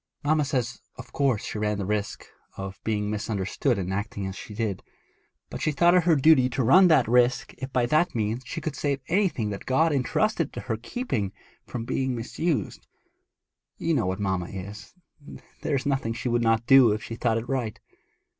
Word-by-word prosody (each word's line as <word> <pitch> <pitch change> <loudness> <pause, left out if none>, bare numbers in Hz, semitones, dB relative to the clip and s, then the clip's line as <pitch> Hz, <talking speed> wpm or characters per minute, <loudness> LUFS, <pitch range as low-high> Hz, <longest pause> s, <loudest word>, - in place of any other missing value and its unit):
Mamma 150 0 +2
says 125 -4 -2
of 125 -1 -12
course 135 -7 +1
she - - -5
knew - - -6
she 105 - -4
ran 105 -1 -1
the 100 - -3
risk 105 +1 -3 0.3
of 95 0 -6
being 105 -1 -1
misunderstood 105 +4 -1
in 95 -1 -3
acting 100 +1 -3
as 95 0 -5
she 105 - -9
did, 105 -4 -2 0.7
but - - -6
she 155 - +1
thought 170 +4 +4
it 180 -2 +4
her 170 -3 +5
duty 140 -3 +5
to 130 +1 -1
run 180 +11 +7
that 155 -9 +4
risk 125 +2 +2
if 130 0 -6
by 125 -2 +2
that 155 +6 +2
means 110 +2 -1
she 125 - -5
could 155 -2 -4
save 140 -2 -1
anything 170 - +1
that 100 - -7
God 160 +5 +3
had 145 - +2
entrusted 165 +4 0
to - - -5
her 110 -3 -3
keeping 115 - -3 0.3
from 120 -2 -5
being 130 +1 -1
misused. 145 +7 -3 0.9
You 165 - 0
know 135 - +1
what 95 +2 -2
mamma 95 -3 -1
is; 100 - -9 0.7
there - - 0
is 135 - -2
nothing 135 -5 0
she 120 +2 -3
would 120 0 +1
not 115 0 +2
do 130 -4 +7
if 110 - -4
she - - -7
thought 115 -1 0
it 115 +2 -4
right.' 125 -5 -2
120 Hz, 205 wpm, -26 LUFS, 105-140 Hz, 0.9 s, run